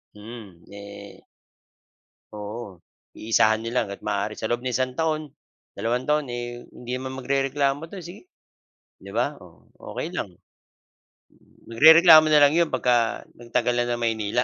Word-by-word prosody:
Mm, 105 -5 -12
ne 100 0 -12 1.6
oo 105 0 -7 0.4
iisahan 110 0 +2
nila 115 +2 -3
hanggat 100 0 -9
maaari 105 +2 -2
sa 110 - -4
loob 120 - 0
ng 130 -1 -3
isang 130 0 0
taon, 155 -2 -1 0.5
dalawang 120 +2 -1
taon, 150 0 +2
eh, 120 0 -6 0.2
hindi 125 0 -9
naman 130 0 -6
magrereklamo 140 +2 -1
'to 185 +1 -10
sige, 180 - -12 0.7
'di - - -11
ba, - - 0
oh, - - -18 0.2
okey 185 - -6
lang. 120 - -4 1.4
Magrereklamo 160 +6 +7
na 155 - +5
lang 145 - +2
'yon 170 -1 +2
pagka 120 -3 0
nagtagal 120 +1 -2
na 120 0 0
ng 120 0 -2
Maynila 115 +1 0
120 Hz, 140 wpm, -24 LUFS, 115-150 Hz, 1.6 s, Magrereklamo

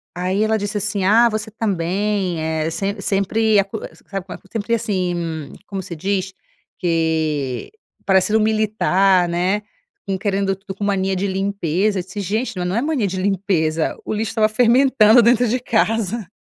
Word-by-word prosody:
Aí 185 +4 0
ela 220 0 +2
disse 205 +1 -3
assim: 205 -1 -1
"Ah, 230 +5 +5
você 215 0 -4
também 195 -2 -1
é 160 0 -1
sem 195 +5 -3
sempre 210 +2 +2
acusa, 200 +2 -3 0.2
sabe 195 -2 -5
quanto 195 - -10
sempre 225 +1 -2
assim" 195 -6 0 0.5
Como 195 -2 -4
se 175 -2 -7
diz? 190 +3 -2 0.5
Que: 160 -6 -1 0.3
"Parecendo 195 +2 +3
militar, 205 -4 +2
né, 185 +4 0 0.5
com 195 -1 -1
querendo 195 0 0
tudo 195 0 -9
com 205 - -6
mania 195 -1 0
de 190 +2 -1
limpeza". 195 0 0
E - - -3
se 190 +3 -8
gente: 215 +4 -2
"Não, 180 - -2
não 180 +2 -1
é 235 - +1
mania 285 -8 0
de 185 0 -3
limpeza, 180 -5 0
o - - -3
lixo 215 0 -2
estava 220 -1 +2
fermentando 240 0 +5
dentro 240 +1 +4
de 245 +3 0
casa. 225 -3 0
200 Hz, 165 wpm, -20 LUFS, 185-215 Hz, 0.5 s, Ah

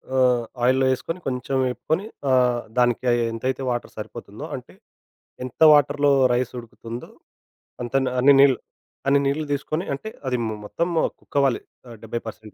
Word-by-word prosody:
ఆ! - - +2 0.5
ఆయిల్‌లో 130 +2 +4
ఏసుకొని, 165 +7 -4
కొంచెం 130 +1 -2
వెపుకొని, 160 +9 -2 0.3
ఆహ్, 125 -2 +3 0.2
దానికి 120 0 +2 0.3
ఎంతైతే 130 +4 -2
వాటర్ 120 -1 -3
సరిపోతుందో, - - -8
అంటే - - -10 0.7
ఎంత 130 - -11
వాటర్‌లో 145 0 +3 0.2
రైస్ 125 0 0
ఉడుకుతుందో, 115 0 -9 0.7
అంతన్న 130 +1 0
అన్ని 140 +2 +7
నీళ్ 135 -3 +6 0.5
అన్ని 140 +1 +5
నీళ్లు 140 +3 0
దీసుకొని 155 +5 -2
అంటే 180 +11 -5 0.2
అది 125 -1 +1
ము 110 - -3
మొత్తం 170 +11 -1 0.3
కుకవ్వాలి 140 -3 0 0.3
ఆహ్, 115 - -10
70 115 +1 -3
పర్సెంట్ 110 -1 -9
130 Hz, 140 wpm, -23 LUFS, 120-140 Hz, 0.7 s, అన్ని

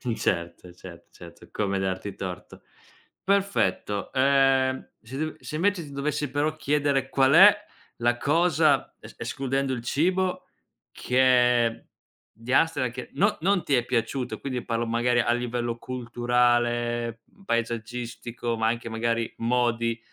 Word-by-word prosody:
Certo, 85 -1 -2
certo, 85 -1 -13
certo, - - -14
come 100 -2 -1
darti 95 +1 -3
torto. 90 -2 -7 0.6
Perfetto, 190 - 0
uhm, 135 -1 +2
se 125 +4 -9
dev 155 +1 -3
se - - -7
invece, 185 +2 +1
ti 145 - -11
dovessi, 145 +1 -2
però, 145 +3 -1
chiedere: 145 -3 0
qual 135 0 +3
è 195 +5 +9 0.4
la 120 +1 +1
cosa 155 0 +2
es - - -13
escludendo 135 0 -2
il 120 - -4
cibo, 180 +8 0 0.5
che 125 -2 +2 0.5
di 115 +2 -7
Amsterdam 145 -4 +2
che 125 +2 -8
no 205 +2 +1
non 190 0 +2
ti 145 - -1
è 120 - +2
piaciuto 125 +1 -2
e - - -15
quindi, 130 -3 -4
parlo, 115 0 -2
magari, 120 +1 +1
a 120 - +1
livello 120 -1 -2
culturale, 120 -1 0
mhmm, 200 - -23
paesaggistico, 115 0 -3
ma 110 0 +1
anche, 115 0 -2
magari, 115 0 -1
modi 115 -1 0
125 Hz, 135 wpm, -26 LUFS, 115-140 Hz, 0.6 s, è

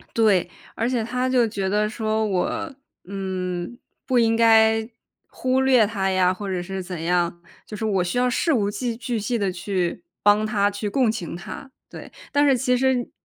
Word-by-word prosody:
对， 205 -6 +3 0.3
而 230 - -1
且 250 -2 0
她 250 +2 -1
就 250 -2 +3
觉 200 -3 -3
得 210 +2 +1
说， 220 0 -1
我， 205 - -2 0.3
嗯， 185 +1 -4 0.3
不 255 -2 +2
应 225 -1 +3
该 225 -1 +4 0.4
忽 255 0 0
略 260 -4 +4
她 195 -3 -1
呀， 185 -1 +3
或 200 +1 -6
者 185 -2 -2
是 190 +1 -5
怎 180 -2 -6
样， 175 0 0 0.3
就 210 - -7
是 220 - -4
我 195 -4 +1
需 180 +7 -2
要 250 0 +3
事 320 +6 +1
无 205 -7 +1
巨 230 +2 -3
巨 240 0 -3
细 230 +3 -1
的 200 -3 0
去 180 - -2 0.2
帮 205 +1 +4
她 205 -2 +1
去 205 +1 -4
共 245 +2 +2
情 215 -7 -5
她。 270 +9 -9 0.2
对， - - -10 0.2
但 290 +1 +3
是 270 -2 +4
其 250 0 +1
实 255 -1 +1
215 Hz, 205 characters per minute, -23 LUFS, 190-245 Hz, 0.4 s, 该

